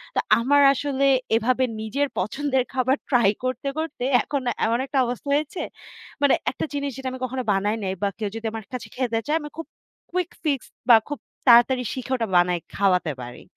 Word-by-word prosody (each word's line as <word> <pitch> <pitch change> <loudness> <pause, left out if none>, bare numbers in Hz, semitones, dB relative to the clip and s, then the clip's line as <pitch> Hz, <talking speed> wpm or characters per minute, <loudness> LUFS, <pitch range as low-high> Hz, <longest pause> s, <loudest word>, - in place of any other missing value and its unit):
তো - - +2 0.2
আমার 285 +5 +4
আসলে 275 0 0 0.3
এভাবে 250 +3 +2 0.2
নিজের 275 +7 -1
পছন্দের 265 +6 0
খাবার 260 0 +2
ট্রাই 240 -7 +4 0.2
করতে, 255 +2 -2
করতে 315 -5 -4 0.2
এখন 280 -2 -2 0.2
এমন 230 +2 +1
একটা 275 +1 -3
অবস্থা 245 +3 -5
হয়েছে। 305 +4 -2 0.6
মানে 285 -2 +5 0.2
একটা - - -4
জিনিস 285 -1 -2
যেটা 265 -1 -3
আমি 260 - -7
কখনো 255 +1 -3
বানাই 205 +2 0
নাই 190 -1 -1
বা, 200 - +2
কেউ 210 -2 -2
যদি 225 0 -6
আমার 220 -2 -6
কাছে 250 - -5
খেতে 245 -3 0
চায় 305 +2 +2
আমি 295 - -7
খুব 325 - -5 0.5
কুইক 360 0 -1
ফিক্স 285 -6 0 0.2
বা 235 - +10
খুব 290 - -4 0.3
তাড়াতাড়ি 245 +1 +6
শিখে 260 0 -6
ওটা 230 -3 -1
বানাই 175 0 +3 0.2
খাওয়াতে 180 -5 +2
পারি। 120 0 -10
255 Hz, 185 wpm, -24 LUFS, 225-280 Hz, 0.6 s, বা